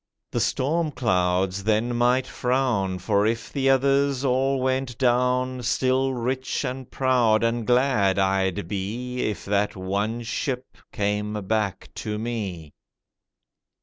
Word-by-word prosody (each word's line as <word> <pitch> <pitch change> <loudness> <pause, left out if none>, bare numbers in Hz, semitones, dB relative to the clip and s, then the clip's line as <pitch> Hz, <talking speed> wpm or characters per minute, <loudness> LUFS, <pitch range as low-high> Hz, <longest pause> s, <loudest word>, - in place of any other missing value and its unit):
the - - -1
storm 155 +5 0
clouds 95 -6 0
then 110 +3 +1
might 125 +2 +3
frown 125 -7 0
For 100 +2 +1
if 115 0 -3
the 135 -1 +1
others 135 0 +2
all 135 +1 +2
went 130 -1 -1
down, 125 0 +1
Still 130 +2 +1
rich 130 +2 -2
and 130 0 -5
proud 120 -4 +2
and 115 -1 0
glad 125 -6 +3
I'd 95 -3 +1
be 115 +7 -3
If 105 -5 -2
that 100 +1 0
one 100 +5 -2
ship 125 +2 -3 0.2
came 105 +1 -1
back 105 -2 -1
to 105 0 -3
me. 100 -9 -4
120 Hz, 125 wpm, -24 LUFS, 100-130 Hz, 0.2 s, might